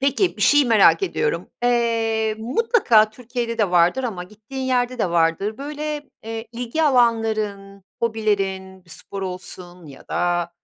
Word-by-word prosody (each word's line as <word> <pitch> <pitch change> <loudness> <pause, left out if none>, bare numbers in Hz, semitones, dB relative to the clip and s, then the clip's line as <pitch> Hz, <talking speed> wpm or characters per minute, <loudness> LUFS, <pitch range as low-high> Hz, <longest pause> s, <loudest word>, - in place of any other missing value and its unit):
Peki, 285 +7 +1
bir - - -3
şeyi 290 -1 +5
merak 230 - +5
ediyorum. 450 +4 -2
Eee, 225 -2 +1
mutlaka 240 - +3
Türkiye'de 235 0 -5
de 205 -5 +1
vardır 180 +9 +3
ama 185 -7 -4
gittiğin 220 +7 -9
yerde 250 -1 0
de 180 - 0
vardır. 170 +6 +1
Böyle, 295 +1 -5
eee, 225 0 -6
ilgi 245 +6 -2
alanların, 220 -7 +1 0.2
hobilerin 195 -4 -2
bir 170 - -20
spor 195 -1 -8
olsun 180 -2 -8
ya 135 -2 -14
da, 175 -1 0
225 Hz, 140 wpm, -22 LUFS, 195-250 Hz, 0.2 s, şeyi